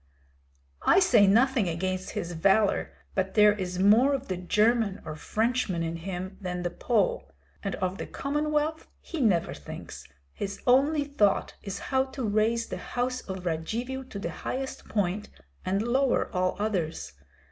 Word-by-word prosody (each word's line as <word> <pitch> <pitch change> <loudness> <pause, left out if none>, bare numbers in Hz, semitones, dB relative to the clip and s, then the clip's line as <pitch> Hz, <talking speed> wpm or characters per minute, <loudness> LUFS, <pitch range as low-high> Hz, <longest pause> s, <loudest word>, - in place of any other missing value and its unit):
"I 375 - +5
say 230 - +5
nothing 235 -1 +3
against 185 +2 -3
his 170 - -3
valor, 195 +5 +2 0.2
but 190 0 -1
there 210 -1 +7
is 185 -3 -4
more 220 +9 +5
of 270 0 -6
the 185 - 0
German 210 +2 +2
or 155 - -5
Frenchman 215 0 0
in 165 0 -3
him 185 +2 -6
than 180 -1 -3
the 175 - -1
Pole. 485 - 0 0.3
And 195 - -3
of 185 +1 -2
the - - -4
Commonwealth 300 +2 -1
he 330 -4 -5
never 190 -9 +2
thinks; 75 - -9 0.3
his 200 0 -5
only 285 +4 +4
thought 275 -9 +1
is 195 -1 -5 0.2
how 265 0 +4
to 265 -3 -4
raise 220 +3 +2
the - - -5
house 250 +1 -2
of 190 -1 -5
Radzivill 230 +11 -3
to - - -7
the 170 -4 -3
highest 265 +9 -5
point 205 0 -1 0.3
and 195 +3 0
lower 255 +2 +1
all 185 0 +1
others. 185 - -2
210 Hz, 160 wpm, -28 LUFS, 185-255 Hz, 0.3 s, there